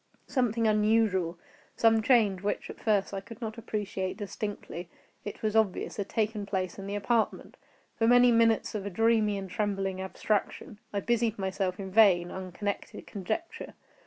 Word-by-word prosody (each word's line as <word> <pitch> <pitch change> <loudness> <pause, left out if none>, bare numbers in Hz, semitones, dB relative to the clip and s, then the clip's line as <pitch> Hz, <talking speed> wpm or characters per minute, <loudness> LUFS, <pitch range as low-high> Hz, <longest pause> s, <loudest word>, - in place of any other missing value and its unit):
Something 235 -4 0
unusual—some 215 0 +1
change 215 -6 +3
which, 205 - -2
at - - -13
first, 205 -3 +1
I 195 - -2
could 220 +2 -12
not 220 -1 -5
appreciate 200 -4 -3
distinctly—it 205 -2 -7
was 215 0 0
obvious, 220 -4 +1
had 200 -2 -3
taken 215 -2 -1
place 185 -2 -2
in 195 - -6
the 200 - -3
apartment. 220 +2 0 0.4
For 225 - +3
many 245 0 +6
minutes 230 -1 +3
of 210 -2 -3
a 200 - -3
dreamy 220 +1 +2
and 195 -1 -5
trembling 195 -1 -2
abstraction, 205 +2 -2
I 200 - -1
busied 235 -1 +1
myself 190 -1 -2
in 190 -1 -5
vain, 185 -4 +5
unconnected 190 +2 -5
conjecture. 270 - -5
205 Hz, 150 wpm, -29 LUFS, 190-225 Hz, 0.4 s, many